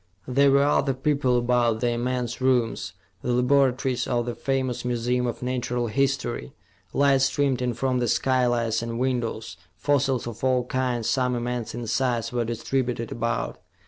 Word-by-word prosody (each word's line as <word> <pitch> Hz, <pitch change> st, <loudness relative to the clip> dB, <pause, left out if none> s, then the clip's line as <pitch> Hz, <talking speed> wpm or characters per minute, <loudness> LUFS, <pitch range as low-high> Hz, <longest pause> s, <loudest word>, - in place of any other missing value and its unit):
There 140 Hz, +2 st, +4 dB
were 140 Hz, +1 st, +5 dB
other 140 Hz, -2 st, +2 dB
people 135 Hz, -2 st, +1 dB
about 120 Hz, -2 st, +2 dB
the 120 Hz, -, +2 dB
immense 120 Hz, +1 st, -2 dB
rooms, 125 Hz, -3 st, +1 dB, 0.3 s
the 125 Hz, -, -1 dB
laboratories 130 Hz, 0 st, +2 dB
of 120 Hz, -1 st, 0 dB
the 120 Hz, -, -3 dB
famous 130 Hz, +1 st, -2 dB
Museum 125 Hz, +1 st, 0 dB
of 120 Hz, -, -4 dB
Natural 125 Hz, -1 st, -1 dB
History. 135 Hz, -, -1 dB, 0.4 s
Light 140 Hz, -1 st, +3 dB
streamed 135 Hz, -1 st, +1 dB
in 125 Hz, -2 st, -1 dB
from 130 Hz, 0 st, 0 dB
the 120 Hz, -, 0 dB
skylights 120 Hz, -3 st, +1 dB
and 115 Hz, 0 st, -4 dB
windows; 120 Hz, -3 st, -2 dB, 0.2 s
fossils 135 Hz, 0 st, +1 dB
of 120 Hz, 0 st, -7 dB
all 130 Hz, -1 st, +2 dB
kinds, 125 Hz, -3 st, -1 dB
some 125 Hz, -2 st, +1 dB
immense 120 Hz, -1 st, -3 dB
in 120 Hz, 0 st, -5 dB
size, 120 Hz, 0 st, 0 dB
were 120 Hz, -1 st, +1 dB
distributed 120 Hz, 0 st, -2 dB
about. 115 Hz, 0 st, -2 dB
125 Hz, 155 wpm, -25 LUFS, 120-130 Hz, 0.4 s, were